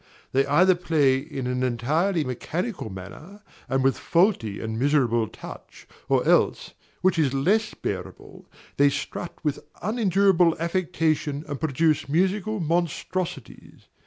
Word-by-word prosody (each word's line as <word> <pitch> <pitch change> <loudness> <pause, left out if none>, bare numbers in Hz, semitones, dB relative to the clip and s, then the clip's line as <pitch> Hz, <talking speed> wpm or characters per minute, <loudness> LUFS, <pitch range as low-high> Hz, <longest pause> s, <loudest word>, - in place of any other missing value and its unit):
They 135 +1 +2
either 180 +7 +5
play 150 -7 +2
in 135 -2 -6
an 125 0 -1
entirely 150 +9 +1
mechanical 155 - -4
manner 155 - -10 0.3
and 135 +1 +1
with 135 0 +2
faulty 170 - +1
and 110 0 -4
miserable 125 -5 +2
touch, - - -12 0.2
or - - +2
else, - - +2 0.3
which 185 -2 +2
is 140 -4 +2
less 210 +11 +1
bearable, 90 -4 -7 0.3
they 140 0 +5
strut 170 +4 -5
with 150 -3 -1 0.2
unendurable 195 -5 +3
affectation 160 -4 -1
and 145 -3 -5
produce 155 -1 +1
musical 190 +6 0
monstrosities. 170 -3 -3
155 Hz, 125 wpm, -25 LUFS, 135-180 Hz, 0.3 s, either